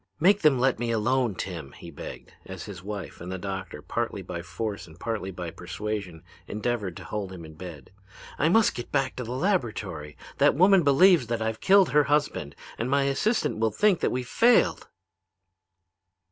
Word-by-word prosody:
"'Make 195 +5 +4
them 150 -4 +5
let 130 -1 +2
me 120 -1 -1
alone. 115 0 +1
Tim,' 85 -7 -6
he - - -11
begged, - - -9
as 95 -3 -7
his 95 -3 -8
wife 95 -6 -7
and 90 +1 -6
the 95 - -3
doctor, 95 -1 -6
partly - - -3
by 85 - -5
force 95 +2 -5
and 80 +1 -16
partly 110 -5 -3
by 90 -3 -6
persuasion, 95 -2 -5 0.2
endeavored 105 -4 -2
to - - -9
hold 100 -3 -4
him 85 -3 -9
in 80 - -11
bed. 80 -4 -10 0.5
'I 155 - +3
must 225 +4 +4
get 120 - -7
back 135 -2 0
to 125 - -3
the 115 - -6
laboratory. 110 - -2 0.2
That - - +5
woman 185 +4 +6
believes 150 -1 +5
that 115 0 -1
I've 110 0 -3
killed 195 -4 +5
her 150 +1 +4
husband, 145 - 0 0.2
and 115 +3 -1
my 140 +1 +3
assistant 140 - 0
will 110 0 +2
think 190 - +2
that - - +1
we've 125 -1 -3
failed.' 235 - +3
110 Hz, 185 wpm, -26 LUFS, 95-140 Hz, 0.5 s, woman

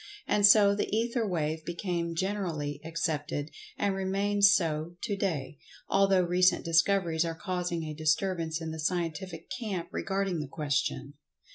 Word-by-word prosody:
And 205 -1 +5
so 205 -1 +7
the 205 - -2
Ether 230 +1 0
Wave 160 -3 -2
became 170 -1 -3
generally 165 -7 -2
accepted, 155 -2 -3 0.3
and 200 -1 +1
remains 195 +1 +3
so 165 -3 0
to 210 -4 -1
day, 160 -8 -3 0.3
although 195 -1 +4
recent 180 +1 +3
discoveries 165 0 +2
are 165 -1 -3
causing 180 -1 -3
a 155 -1 -5
disturbance 160 +1 0
in 160 -1 -4
the 160 - -6
scientific 165 +1 -3
camp 190 -4 -4
regarding 195 -3 -1
the 150 - -4
question. 140 - -2
175 Hz, 140 wpm, -29 LUFS, 160-195 Hz, 0.3 s, so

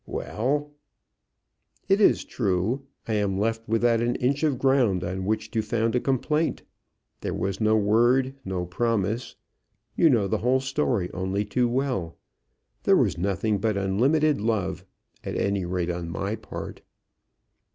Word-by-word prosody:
"Well?" 145 +6 -2 1.2
"It 195 +2 +3
is - - +4
true. 110 +5 -1 0.2
I 110 - -1
am 100 -2 0
left 115 +2 -1
without 115 +1 +2
an 120 +1 0
inch 135 +3 0
of 150 -5 +1
ground 125 -9 +2
on 95 +2 -3
which 110 +1 -1
to 110 - 0
found 115 +1 0
a - - +3
complaint. 150 +5 0 0.6
There - - -3
was 95 +2 -2
no 110 0 +4
word; 120 +5 +3
no 95 -3 -3
promise. 110 +3 -1 0.6
You 165 - +5
know 115 -7 +3
the - - 0
whole 125 +3 +2
story 130 -8 -1
only 95 +2 -1
too 120 +4 +1
well. 125 -10 -2 0.6
There - - +4
was - - +1
nothing 100 +3 0
but 105 0 0
unlimited 130 +9 +2
love, 100 -4 -1 0.4
at - - -4
any 100 -2 0
rate 90 -1 -1
on 85 -1 -4
my 100 +5 -2
part." - - -8
110 Hz, 150 wpm, -25 LUFS, 95-130 Hz, 1.2 s, You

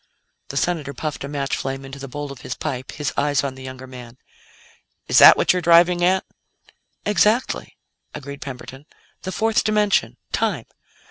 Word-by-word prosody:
The 140 - -5
Senator 150 -4 -1
puffed 150 +1 -4
a - - -4
match 140 -1 -2
flame 135 0 -4
into 135 +1 -9
the 135 - -7
bowl 145 +2 -6
of 135 - -10
his 125 - -5
pipe, 130 -4 -5
his 150 -2 -3
eyes 145 -1 +1
on 140 -2 -2
the 130 - -12
younger 130 0 -8
man. 125 -2 -11 0.9
"Is - - +5
that - - +10
what - - +3
you're 180 - -1
driving 175 +1 +5
at?" 185 +2 +2 0.8
"Exactly," 210 +5 +1 0.3
agreed 140 -1 -8
Camberton. 135 +1 -9 0.3
"The 185 - -5
fourth 220 +2 +1
dimension. 210 -2 +1
Time. - - -1
145 Hz, 170 wpm, -22 LUFS, 135-175 Hz, 0.9 s, that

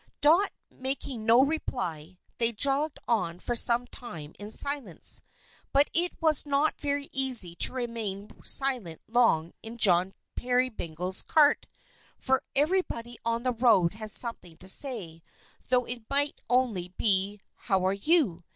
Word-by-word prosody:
Dot 335 +7 +3 0.2
making 260 -3 -5
no 235 +3 +6
reply, 185 - -4 0.2
they 230 0 +4
jogged 280 +6 +1
on 195 -8 0
for 240 +6 -4
some 235 +1 +4
time 165 -13 -10
in 205 +1 -8
silence. 275 - +2 0.5
But 280 +1 +3
it 350 +2 +2
was 315 -3 +2
not 290 +1 -1
very 285 -1 -3
easy 255 -10 +3
to - - +5
remain 225 -5 -5
silent 250 - +1
long 220 -9 +1
in 225 +1 -10
John 185 -3 +2 0.2
Peerybingle's 200 -9 -1
cart, 300 -2 +2 0.5
for 265 0 0
everybody 275 -7 -1
on 230 +1 -1
the 255 -1 0
road 220 -8 +2
had 215 0 -8
something 190 -8 +1
to 185 - -13
say, 190 - 0 0.5
though 250 -1 +2
it 240 -2 -9
might 285 +1 -2
only 240 -8 0
be, 200 0 +1 0.3
"How 190 -1 +1
are 190 - +1
you?" 200 - 0
235 Hz, 140 wpm, -27 LUFS, 190-275 Hz, 0.5 s, no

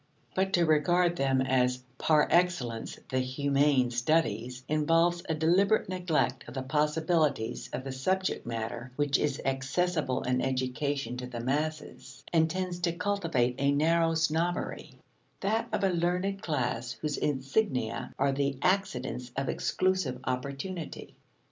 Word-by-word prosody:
But 190 0 +1
to 175 -1 +4
regard 170 +3 +3
them 135 -4 +2
as 125 -1 +1 0.2
par 155 -2 +4
excellence 170 -11 +1
the 130 - 0
humane 140 0 +2
studies 125 -2 0
involves 165 +3 +2
a 160 - +1
deliberate 180 +7 +3
neglect 180 -4 0
of - - -9
the 130 - -2
possibilities 150 -2 0
of 130 - -4
the 135 - -5
subject 185 +9 -1
matter 115 +2 -5
which 145 0 +2
is 145 -2 0
accessible 135 +2 0
in 125 0 +1
education 130 0 -1
to 125 0 -5
the 120 -1 -6
masses, 145 +1 -3
and 160 -1 +4
tends 180 0 -3
to 170 -1 0
cultivate 170 -10 0
a 140 +1 +3
narrow 165 +3 +3
snobbery: 165 +2 -1 0.5
that 220 +4 0
of - - -1
a 195 - +4
learned 180 +3 0
class 120 -5 -2
whose 150 +6 -3
insignia 130 - -1
are 140 +1 +2
the 140 0 -1
accidents 130 -10 0
of 135 0 -1
exclusive 185 -8 0
opportunity. 140 +7 -4
145 Hz, 135 wpm, -29 LUFS, 130-175 Hz, 0.5 s, to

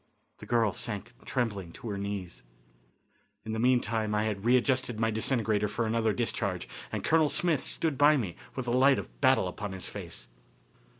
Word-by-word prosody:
The - - -10
girl 115 -4 +2
sank 115 +1 -5
trembling 100 -9 -2
on 115 - -4
her - - -2
knees. 100 -3 -5 1.0
In 110 - -4
the 110 - -2
meantime 115 -3 +2
I 105 - +2
had 105 -1 -3
readjusted 125 -1 +2
my 115 0 +2
disintegrator 110 -2 0
for 115 +3 -2
another 110 0 +1
discharge, - - -2 0.2
and - - -3
Colonel 160 -2 +4
Smith 165 -4 +2
stood 155 -5 -1
by 150 +1 +6
me 100 -9 -3 0.2
with 130 - -3
the 120 - -1
light 130 +2 +5
of - - -8
battle 130 -8 +4
upon 100 +2 -5
his 95 - -6
face. 90 -5 -8
115 Hz, 175 wpm, -29 LUFS, 105-130 Hz, 1.0 s, by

